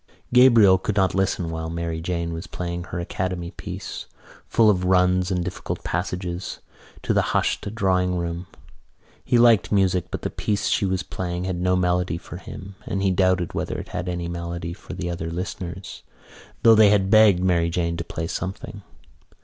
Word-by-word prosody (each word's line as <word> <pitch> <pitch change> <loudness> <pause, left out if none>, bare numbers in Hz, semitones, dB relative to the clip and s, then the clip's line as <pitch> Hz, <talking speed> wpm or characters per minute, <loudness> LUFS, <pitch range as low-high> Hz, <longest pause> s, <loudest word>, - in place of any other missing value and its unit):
Gabriel 115 -7 +7
could 105 +2 -2
not 95 -2 +2
listen 95 -3 0
while 80 0 -4
Mary 85 -1 -3
Jane 85 -1 -2
was 80 +3 -6
playing 85 0 -4
her 90 - -5
Academy 90 0 -3
piece, - - -7 0.4
full 115 - +4
of 95 -4 +3
runs 90 0 +3
and 90 -2 -1
difficult - - -5
passages, 90 +1 -3 0.5
to - - +1
the - - +3 0.2
hushed 100 - -1
drawing 90 -3 +1
room. 85 +1 -4 0.8
He 120 - +2
liked 115 -3 +5
music 95 -3 +2
but - - -5
the - - -2
piece 105 -1 -1
she 100 - +1
was 95 -1 -1
playing 90 -1 -4
had 90 -1 -3
no 90 0 +2
melody 90 -2 +1
for - - -9
him 100 +1 -9
and 95 0 -2
he 95 - +3
doubted 95 -1 +1
whether - - -3
it - - -7
had 90 0 -4
any 85 -1 -3
melody 85 0 -5
for 95 - -10
the 90 -1 -4
other 85 -1 -4
listeners, 90 +1 -6 0.6
though 115 - +8
they 110 -2 +7
had 100 -2 +2
begged 105 -5 +6
Mary 85 -2 +2
Jane 85 -1 -1
to 85 - -3
play 80 0 -5
something. 100 +5 -5
90 Hz, 180 wpm, -23 LUFS, 85-95 Hz, 0.8 s, though